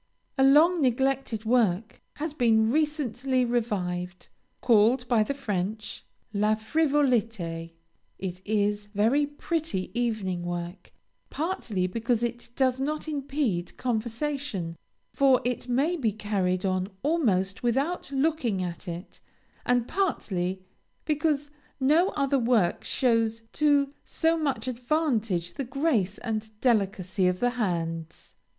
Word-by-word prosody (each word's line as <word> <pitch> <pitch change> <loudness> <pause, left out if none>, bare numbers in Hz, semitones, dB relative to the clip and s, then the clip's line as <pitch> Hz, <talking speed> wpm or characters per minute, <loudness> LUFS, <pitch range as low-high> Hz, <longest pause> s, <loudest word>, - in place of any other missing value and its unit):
A 270 - +3
long 310 +6 +6
neglected 260 -3 0
work 220 -3 +1
has 305 0 -4
been 225 -5 +3
recently 270 -4 +1
revived, 185 -7 -2 0.3
called 240 +2 +4
by 235 -3 +3
the 245 +6 -1
French 215 -3 -3 0.3
"La 210 +1 +2
Frivolité." 225 - 0 0.4
It 185 -1 -5
is 205 -1 0
very 250 +8 +3
pretty 295 - -3
evening 215 -7 -1
work, 175 +1 -5 0.4
partly 265 - -2
because 230 +5 0
it 240 0 -3
does 260 -1 +2
not 300 +3 -2
impede 275 - -2
conversation, 235 - -2 0.4
for 270 -2 +5
it 250 0 -2
may 280 +8 +2
be 240 -10 0
carried 195 -3 -1
on 185 0 0
almost 205 - +1
without 275 +7 -1
looking 270 - 0
at 175 +1 -6
it, 175 +2 -7 0.5
and 245 -1 +2
partly 190 - -1 0.4
because 300 -2 0 0.3
no 310 +8 +4
other 275 -1 +2
work 230 -7 +2
shows 230 -3 +1
to 285 -2 +3
so 325 0 +1
much 290 -5 -1
advantage 240 - 0
the 280 - -3
grace 250 - 0
and 220 -2 -5
delicacy 195 -5 +1
of 180 0 0
the 245 0 +2
hands. 165 -8 -3
235 Hz, 120 wpm, -27 LUFS, 195-280 Hz, 0.5 s, long